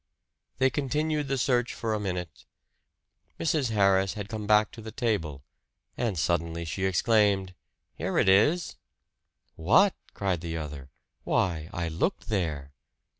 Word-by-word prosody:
They 130 0 +3
continued 150 +2 -1
the 135 0 -1
search 125 -2 +1
for 115 -1 -2
a 105 - -1
minute. 90 -6 -5 0.9
Mrs. 150 -5 +1
Harris 100 -3 +3
had 105 -1 -6
come 110 -2 -5
back 105 0 +4
to 115 - -11
the 110 0 -8
table; 85 - -2 0.5
and 110 -7 -1
suddenly 85 0 -1
she 95 +4 -2
exclaimed, 95 -1 +2 0.4
"Here 90 +5 -3
it - - +3
is!" 145 - +3 0.8
"What!" 145 - +4 0.2
cried 95 -4 -1
the 85 -1 -4
other. 75 -4 -7 0.3
"Why, 80 -4 0
I 85 0 -3
looked 85 - -2
there!" 80 -9 -2
100 Hz, 135 wpm, -28 LUFS, 85-120 Hz, 0.9 s, back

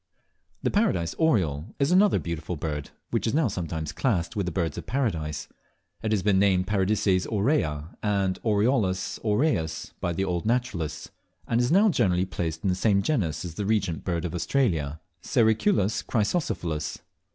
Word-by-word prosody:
The - - +1
Paradise 190 - +1
Oriole 90 - +1
is 140 +3 +1
another 195 +2 +5
beautiful 85 0 -4
bird, 75 -2 -4 0.2
which - - 0
is 110 - 0
now 155 -4 +3
sometimes 80 -6 -3
classed 100 -8 -1
with 100 -3 -1
the - - -1
Birds 80 -2 -1
of - - -10
Paradise. 80 - -2 0.5
It 110 - -2
has 105 -4 +1
been 100 -2 +3
named 95 -2 +3
Paradises 95 -1 +1
aurea 100 - 0
and 100 -3 0
Oriolus 105 -3 +1
aureus 105 - 0
by 85 - -1
the 95 +3 -1
old 90 -2 -1
naturalists, 100 -11 -2 0.4
and 115 +1 +2
is 125 +3 +1
now 205 +5 +5
generally 90 - +2
placed 80 -3 -4
in 95 - +2
the - - +2
same 100 0 +2
genus 95 - 0
as 85 - -6
the 100 +4 -3
Regent 100 -7 0
Bird 85 -2 -2
of 85 - -4
Australia 85 - 0 0.2
(Sericulus 110 - +2
chrysocephalus). 95 - -1
95 Hz, 165 wpm, -26 LUFS, 85-115 Hz, 0.5 s, another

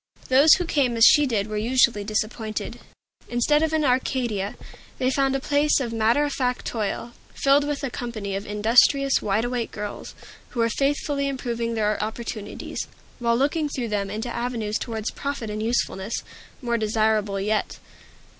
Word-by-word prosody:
Those 280 +4 +7
who 360 - -2
came 265 -7 +1
as 225 - +7
she 295 -2 +6
did 215 -5 0
were 215 0 -4
usually 235 -1 +2
disappointed. 215 +1 -3 0.5
Instead 270 +5 +2
of 320 -1 +1
an 315 -1 +1
Arcadia, 250 -6 0 0.4
they 255 0 +1
found 270 0 +1
a - - 0
place 290 +2 +2
of 240 -4 -3
matter 230 +5 +3
of 290 -1 -1
fact 250 -2 -1
toil, 225 +1 -3 0.2
filled 280 +1 +3
with 295 0 -3
a 270 - -2
company 215 -6 -4
of 195 - -3
industrious, 240 +6 +4
wide 210 +3 0
awake 240 -1 -2
girls, 210 -1 -7 0.3
who 240 - -6
were 230 0 +3
faithfully 280 +2 0
improving 235 -4 -3
their 210 -1 0
opportunities, 220 -1 -5 0.3
while 235 -1 +2
looking 295 +3 +1
through 250 -5 -3
them 200 -2 -1
into 215 +4 -4
avenues 230 -3 -2
Toward 220 -2 -5
profit 280 -6 -4
and 210 0 -4
usefulness, 220 -2 -1 0.4
more 235 -1 0
desirable 215 -2 +1
yet. 210 +2 -1
235 Hz, 165 wpm, -24 LUFS, 215-275 Hz, 0.5 s, Those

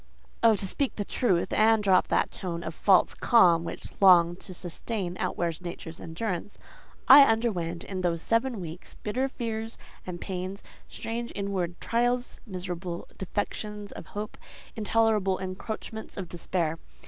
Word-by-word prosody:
Oh!—to 220 -4 +4
speak 270 +8 -1
truth, 185 -9 +1
and 220 0 +4
drop 190 -2 +4
that - - +1
tone 170 -2 -5
of - - -3
a - - -19
false 190 -3 +4
calm 175 -9 +5
which 165 - -7
long 175 -3 +7
to 190 - -10
sustain, 180 +1 -4
outwears 170 -2 -2
nature's 170 -1 -7
endurance—I 210 - +3
underwent 200 -9 0
in 190 -2 -4
those 170 -2 -1
seven 230 0 +1
weeks 170 0 -7
bitter 250 +6 -1
fears 225 -3 -4 0.3
and 175 -1 -5
pains, 190 +1 -5 0.2
strange 235 +1 -5
inward 190 -4 -2
trials, 245 +1 0
miserable 180 -2 -5
defections 205 +1 -4
of - - -9
hope, 210 +1 -5 0.4
intolerable 215 -3 +2
encroachments 215 +4 -6
of 190 -3 -4
despair. 165 -1 -2
195 Hz, 135 wpm, -28 LUFS, 175-225 Hz, 0.4 s, long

